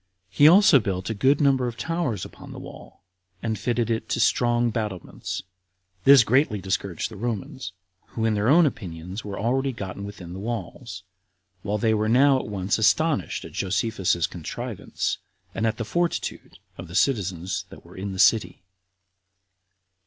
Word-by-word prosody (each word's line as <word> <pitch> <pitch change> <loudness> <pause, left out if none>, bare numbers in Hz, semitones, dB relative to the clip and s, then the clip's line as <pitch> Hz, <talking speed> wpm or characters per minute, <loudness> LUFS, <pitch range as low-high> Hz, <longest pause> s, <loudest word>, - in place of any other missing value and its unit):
He 145 - +6
also 180 -3 +7
built 95 -1 -3
a - - 0
good 130 +7 +3
number 135 -3 +3
of 120 -1 -5
towers 155 - -2
upon - - -12
the - - -8
wall, - - -12 0.4
and 110 -3 -2
fitted 120 +1 0
it 115 - -2
to - - -1
strong 120 -1 +2
battlements. 105 -2 -4 0.6
This 135 -3 +9
greatly 120 -2 +2
discouraged 95 0 -3
the - - -9
Romans, 120 - -4 0.3
who 110 - -3
in 110 - +2
their 105 +1 0
own 165 +4 +6
opinions 90 - -5
were 100 -1 -6
already 130 +5 0
gotten 100 -4 -6
within 90 -4 -8
the 95 - -7
walls, 115 -2 -6 0.6
while 105 +2 -1
they 110 +1 +2
were 110 0 +1
now 135 +3 +5
at - - -6
once 100 0 -1
astonished 110 - +1
at - - -9
Josephus's 95 -3 0
contrivance, 85 -3 -4 0.3
and 110 - 0
at 110 -1 -1
the 115 - -3
fortitude 170 +9 -2 0.2
of - - -7
the 85 - -9
citizens 95 -9 0
that - - -14
were - - -15
in 100 +1 -5
the 95 - -6
city. 105 -1 +3
110 Hz, 165 wpm, -25 LUFS, 95-130 Hz, 0.6 s, This